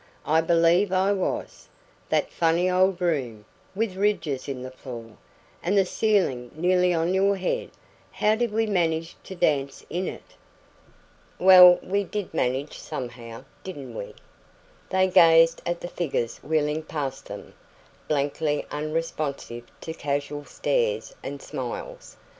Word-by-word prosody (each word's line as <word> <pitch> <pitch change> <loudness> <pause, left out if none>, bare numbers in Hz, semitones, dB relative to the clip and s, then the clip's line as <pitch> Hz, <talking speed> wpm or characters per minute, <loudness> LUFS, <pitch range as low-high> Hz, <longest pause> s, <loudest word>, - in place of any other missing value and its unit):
I 160 +2 +3
believe 170 +3 +3
I 190 +1 +2
was. 195 -2 -3 0.4
That - - +1
funny 170 +2 +2
old 185 0 +3
room, 130 -12 -1 0.3
with 210 -2 -1
ridges 185 -9 -1
in 130 -3 -5
the 130 - -7
floor, 120 -4 -9 0.5
and 190 +4 +1
the 195 - +5
ceiling 180 - +1
nearly 180 +2 +2
on 170 +1 +1
your 195 +1 +3
head 185 -1 -2 0.4
how 210 - +2
DID 235 0 0
we 225 +1 +1
manage 165 -5 0
to 190 - -8
dance 140 -6 0
in 180 +2 -2
it?" - - -9 1.0
"Well, 180 -1 +9
we 200 +2 0
did 200 -1 -5
manage 135 0 -1
somehow, 120 -4 -7 0.2
didn't 140 -10 -8
we?" 100 - -7 0.7
They 190 0 +3
gazed 165 -2 +6
at 175 0 -2
the - - -4
figures 135 -10 -2
wheeling 155 0 0
past 140 -4 -5
them, 100 0 -9 0.5
blankly 145 +1 0
unresponsive 150 -5 -3 0.2
to 160 - -5
casual 145 -1 -3
stares - - -1
and - - -6
smiles. - - -7
165 Hz, 135 wpm, -25 LUFS, 140-185 Hz, 1.0 s, Well